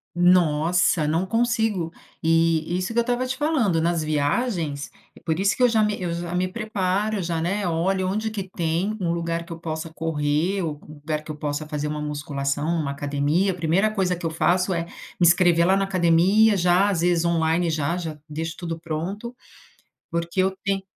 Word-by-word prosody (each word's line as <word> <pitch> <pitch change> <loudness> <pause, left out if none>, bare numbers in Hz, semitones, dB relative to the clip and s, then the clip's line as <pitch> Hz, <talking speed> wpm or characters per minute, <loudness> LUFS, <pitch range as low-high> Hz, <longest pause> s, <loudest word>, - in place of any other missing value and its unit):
Nossa, 175 -2 +3
não 165 +4 +1
consigo. 225 -5 0 0.3
E 165 +1 +2
isso 185 +5 -2
que 235 - -2
eu - - +7
estava 245 +1 0
te 255 - -2
falando, 260 - +1
nas 170 -1 +1
viagens 155 - -1 0.3
por 160 +1 -1
isso 200 +1 +2
que 255 - -1
eu 250 - +7
já 220 -2 +2
me 210 0 0
eu 170 -1 -2
já 170 +1 -4
me 185 +1 +1
preparo, 205 -1 -1
já, 165 -1 -2
né, 195 +4 -1
olho 185 +3 0
onde 215 +3 -1
que 205 -2 -3
tem 175 +5 -1
um 170 -2 0
lugar 170 0 -2
que 170 - -10
eu 165 - -6
possa 160 0 -5
correr, 160 +4 0
ou 150 -3 -3
um 155 - -11
lugar 150 +1 -3
que 155 - -9
eu 150 - -5
possa 150 +1 -3
fazer 150 -1 -3
uma 150 0 -3
musculação, 145 -1 -2
uma 140 -2 -2
academia 145 +7 0
a - - -5
1ª 180 +5 +1
coisa 190 -4 0
que 170 - -5
eu - - -1
faço 180 +3 +1
é 170 - -1
me 175 0 -2
inscrever 170 -1 +5
lá 190 +1 +4
na 195 - +1
academia 195 +4 +4
já, 180 +3 +3
às 170 -4 0
vezes 175 -1 +2
online 165 0 +1
já 155 +2 -1
já 160 -4 -5
deixo 160 +2 -4
tudo 165 -2 -4
pronto, 180 +9 -5 0.8
porque 170 +2 -1
eu 190 0 0
ten 195 -1 0
170 Hz, 200 wpm, -24 LUFS, 160-195 Hz, 0.8 s, eu